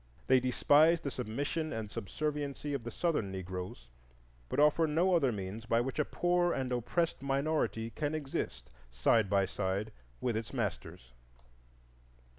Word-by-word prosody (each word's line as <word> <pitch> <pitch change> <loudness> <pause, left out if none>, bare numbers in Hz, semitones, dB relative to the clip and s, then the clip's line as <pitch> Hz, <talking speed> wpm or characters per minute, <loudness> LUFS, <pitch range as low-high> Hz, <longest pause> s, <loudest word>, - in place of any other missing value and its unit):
They 130 0 +5
despise 145 +6 +4
the 140 - -4
submission 145 +7 -2
and 110 -2 -4
subserviency 145 +6 -3
of 135 -4 -2
the 120 - -4
Southern 135 - -1
Negroes, 90 -8 -6 0.6
but - - -1
offer 150 +2 +5
no 170 +5 +2
other 140 -7 +3
means 105 +2 -5
by 115 0 +3
which 130 +4 -2
a 150 - +3
poor 175 0 +1
and 130 -1 -2
oppressed 145 +7 0
minority 140 -4 0
can 150 +5 -2
exist 145 -3 -4 0.2
side 95 - +2
by 100 -1 +3
side 100 +2 -2 0.3
with 120 -3 -1
its 110 -1 -4
masters. 65 0 -4
130 Hz, 145 wpm, -32 LUFS, 110-150 Hz, 0.6 s, They